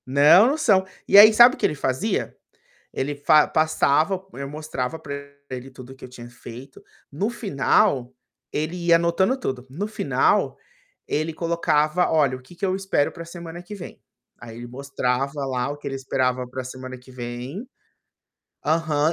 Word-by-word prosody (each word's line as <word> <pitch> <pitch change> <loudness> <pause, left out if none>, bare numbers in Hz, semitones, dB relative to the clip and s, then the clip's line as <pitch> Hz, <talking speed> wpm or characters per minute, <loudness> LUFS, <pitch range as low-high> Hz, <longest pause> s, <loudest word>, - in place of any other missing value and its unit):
Não 165 - +5
são. 205 -11 +3 0.2
E - - +6
aí, 215 +2 +10
sabe 240 +3 +7
o - - -18
que - - 0
ele - - 0
fazia? 140 - -2 0.6
Ele 145 +2 -2
fa 150 +1 +4
passava, 155 +3 +1
eu 140 0 -6
mostrava 150 -1 -4
para 140 -2 -7 0.4
ele 130 +1 -7
tudo 130 0 -12
o - - -14
que - - -13
eu - - -8
tinha 120 -1 -11
feito, 120 +2 -12 0.3
no 195 +10 -2
final, 135 - +1 0.4
ele 155 +4 -2
ia 170 -1 +4
anotando 170 +8 +1
tudo, 130 - -4
no 180 +10 -4
final, 215 - +1 0.5
ele 155 +2 -1
colocava: 165 0 +1
"Olha 145 -5 +2
o - - -16
que 150 +7 -17
eu 190 -1 +1
espero 190 -7 0
para 170 - -9
a - - -13
semana 170 0 -9
que 180 +4 -9
vem". 185 - -10 0.4
Aí, 115 -1 -10
ele 120 0 -8
mostrava 135 +1 -2
lá 130 -1 -2
o 145 - -5
que 145 - -8
ele 135 - -4
esperava 130 -1 -1
para 130 +1 -6
a - - -10
semana 130 0 -8
que 125 +1 -17
vem 125 - -7 1.0
aham. 155 0 +1
145 Hz, 175 wpm, -23 LUFS, 130-170 Hz, 1.0 s, aí